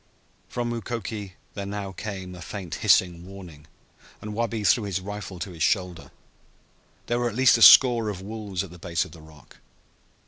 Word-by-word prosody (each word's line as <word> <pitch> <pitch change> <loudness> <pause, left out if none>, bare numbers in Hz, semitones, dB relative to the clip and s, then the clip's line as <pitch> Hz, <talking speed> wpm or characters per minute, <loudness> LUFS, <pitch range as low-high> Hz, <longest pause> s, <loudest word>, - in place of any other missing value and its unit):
From 120 -1 -3
Mukoki 110 -4 -5 0.2
there 100 -2 -5
now 100 -1 -5
came 95 -2 -7
a 90 - -10
faint 90 -1 -7
hissing 85 -2 +3
warning, 90 -6 -12 0.5
and 105 0 -7
Wabi 115 -1 -2
threw 105 +2 +3
his 95 -2 -2
rifle 100 0 -7
to 95 +2 -6
his 85 -2 -11
shoulder. 90 -3 0 1.0
There 120 0 -1
were 120 0 0
at 105 - -9
least 130 -1 +5
a - - -4
score 120 -3 +8
of 100 -3 -5
wolves 100 -2 -5
at 95 - -10
the 90 - -13
base 85 -1 -1
of - - -13
the 85 - -13
rock. 75 -3 -17
100 Hz, 180 wpm, -25 LUFS, 90-110 Hz, 1.0 s, score